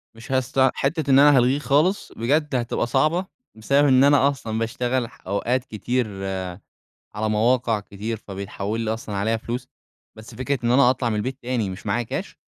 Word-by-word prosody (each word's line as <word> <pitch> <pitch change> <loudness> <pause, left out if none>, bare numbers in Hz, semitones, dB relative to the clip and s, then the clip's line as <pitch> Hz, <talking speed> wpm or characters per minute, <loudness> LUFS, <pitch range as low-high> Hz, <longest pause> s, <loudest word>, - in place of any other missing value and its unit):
مش 115 +3 -11
هست 130 -1 -1 0.2
حتّة 145 +1 -1
إن 135 - +7
أنا 145 -1 +7
هالغيه 125 +3 +3
خالص، 150 +8 +1
بجد 145 +4 0
هتبقى 120 -1 -1
صعبة، 155 +8 +1 0.3
بسبب 140 +6 +2
إن 130 0 +5
أنا 140 -1 +5
أصلًا 115 -6 -4
باشتغل 120 +2 -1
ح 125 - -20
أوقات 120 +6 0
كتير 120 +3 -2 1.1
على 110 +1 -1
مواقع 115 +1 +2
كتير، 105 +2 -5
فبيتحول 100 +2 -5
لي 110 -1 -1
أصلًا 110 -2 -6
عليها 110 +3 0
فلوس. 120 +3 -5 0.5
بس 110 +1 -12
فكرة 130 +3 -2
إن 120 - +2
أنا 125 0 +5
أطلع 125 -2 0
من 110 - -1
البيت 130 +5 -3
تاني 120 -5 -1
مش 95 +1 -8
معايا 120 - 0
كاش؟ - - -5
120 Hz, 175 wpm, -23 LUFS, 110-135 Hz, 1.1 s, إن